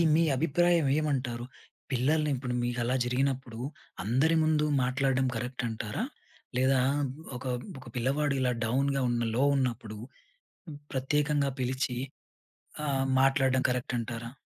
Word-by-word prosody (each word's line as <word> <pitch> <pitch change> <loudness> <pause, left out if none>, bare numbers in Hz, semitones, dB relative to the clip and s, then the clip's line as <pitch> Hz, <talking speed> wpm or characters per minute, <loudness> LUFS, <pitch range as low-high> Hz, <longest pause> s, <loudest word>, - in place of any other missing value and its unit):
మీ 165 - +4
అభిప్రాయం 165 +2 +3
ఏమంటారు? 130 -5 -1 0.5
పిల్లల్ని 150 +4 +2
ఇప్పుడు 125 -1 -3
మీకలా 120 +1 0
జరిగినప్పుడు, 125 -2 -1 0.4
అందరి 130 - +3
ముందు 155 -1 +3 0.2
మాట్లాడడం 130 +1 +1
కరెక్ట్ 125 +2 -3
అంటారా? 110 - -3 0.5
లేదా 130 +1 +4 0.6
ఒక 125 - -10 0.3
ఒక - - -13
పిల్లవాడు 140 +4 +1
ఇలా 125 -1 +2
డౌన్‌గా 135 +4 +1
ఉన్న 120 0 0
లో 130 - +3
ఉన్నప్పుడు, 120 -5 -2 1.0
ప్రత్యేకంగా 145 +1 +1
పిలిచి, 130 0 -1 0.9
ఆ! - - -1 0.4
మాట్లాడడం 135 -1 +3
కరెక్ట్ 125 0 -1
అంటారా? 115 0 -5
130 Hz, 110 wpm, -29 LUFS, 125-140 Hz, 1.0 s, మీ